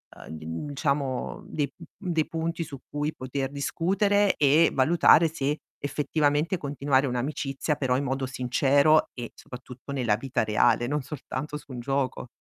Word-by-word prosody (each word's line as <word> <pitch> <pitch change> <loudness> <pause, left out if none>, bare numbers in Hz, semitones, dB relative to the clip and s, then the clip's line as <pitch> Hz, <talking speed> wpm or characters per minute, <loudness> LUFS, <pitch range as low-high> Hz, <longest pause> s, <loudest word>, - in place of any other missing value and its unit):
uhm, - - -12
di 80 0 -8 0.2
diciamo, 140 -2 -2
dei, 145 -3 -2
mhmm, 175 +2 -8
dei 155 -1 +1
punti 165 +1 -2
su 140 -4 -9
cui 150 +1 -2
poter 135 +1 -4
discutere, 195 +8 +1
e 150 +3 +5
valutare 165 +3 +5
se 150 -1 -1 0.2
effettivamente 150 +4 0
continuare 140 -2 +1
un'amicizia 135 +3 -2
però 130 -2 +1
in 140 - 0
modo 135 0 -1
sincero 135 +4 +3
e 120 -2 -7
soprattutto 125 +2 -10
nella 120 -6 +1
vita 130 -1 -1
reale, 120 +2 +3
non 150 +1 -1
soltanto 145 +1 -6
su 150 - -9
un 125 - -6
gioco. 135 0 -2
140 Hz, 150 wpm, -27 LUFS, 130-155 Hz, 0.2 s, e